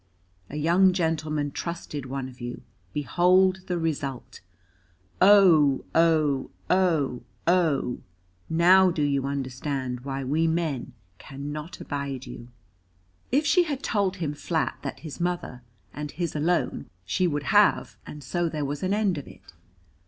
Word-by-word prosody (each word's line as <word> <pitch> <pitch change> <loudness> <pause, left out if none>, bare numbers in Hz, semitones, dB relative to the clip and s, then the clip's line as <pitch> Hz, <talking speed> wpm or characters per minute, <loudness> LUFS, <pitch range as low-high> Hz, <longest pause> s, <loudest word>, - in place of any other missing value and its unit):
A - - -8
young 175 +5 +4
gentleman 155 -4 -1
trusted 150 -4 -5
one 135 0 -4
of 125 0 -13
you; 120 0 -6 0.3
behold 185 +5 +3
the 180 - -1
result. 145 -6 -4 0.8
O! 175 -9 +6
O! 155 -5 +2 0.2
O! 165 -9 +2 0.2
O! 165 -8 +2 0.5
now 180 +3 +6
do 165 -4 -1
you 140 -1 0
understand 130 -1 -3
why 135 +1 -4
we 155 +5 +1
men 160 -6 -2 0.3
cannot 145 +4 -7
abide 140 -2 -4
you? 120 -1 -9 0.8
If 285 +5 +2
she 350 +4 +4
had 285 -4 -4
told 200 -3 0
him 160 -6 -3
flat 160 +2 -2
that - - -6
his 155 -3 -8
mother, 175 -8 -3 0.3
and 150 0 -5
his 170 0 -4
alone, 170 +4 0 0.2
she 180 - +1
would 145 -3 -2
have, - - +4
and 150 -1 -9
so 175 +2 -1
there 150 -2 -3
was 145 +1 -4
an 190 +2 0
end 200 -7 +1
of 140 - -11
it. 100 0 -15
155 Hz, 140 wpm, -26 LUFS, 140-175 Hz, 0.8 s, O